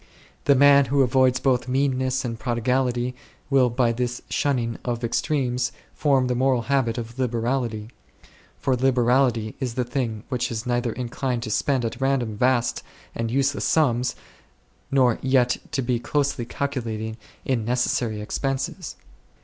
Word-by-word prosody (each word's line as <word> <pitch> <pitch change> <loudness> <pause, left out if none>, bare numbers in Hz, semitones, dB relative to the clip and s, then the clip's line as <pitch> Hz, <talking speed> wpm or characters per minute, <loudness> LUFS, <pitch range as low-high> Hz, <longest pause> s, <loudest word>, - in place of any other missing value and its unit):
The 140 - +5
man 140 +1 +6
who 135 +2 +3
avoids 130 0 +3
both 130 -3 +1
meanness 130 -1 0
and 115 -2 -4
prodigality 125 +1 0 0.4
will 130 -2 +4
by 120 0 +2
this 125 +1 -3
shunning 120 -5 0
of 120 -1 -3
extremes 125 -1 0 0.2
form 135 -4 +2
the 125 - 0
moral 130 -1 +2
habit 130 -2 0
of 115 +1 -6
liberality; 120 -2 -1 0.7
for 130 - +1
liber 125 -1 +2
ality 120 -4 +2
is 125 -4 -3
the 125 - +1
thing 120 -4 -3
which 125 -2 -1
is 115 +1 -4
neither 120 -1 0
inclined 125 0 -3
to 110 - -4
spend 130 +2 +1
at 115 +3 -4
random 130 -5 0
vast 120 +1 +1 0.3
and 115 -1 -2
useless 135 +3 0
sums, 125 -5 +2 0.7
nor 130 -4 +3
yet 130 -2 +2
to 135 - -1
be 120 -1 0
closely 140 -1 -1
calculating 115 -5 -3 0.3
in 125 -4 0
necessary 120 -2 0
ex - - -4
penses. 135 -1 -3
125 Hz, 150 wpm, -24 LUFS, 120-135 Hz, 0.7 s, man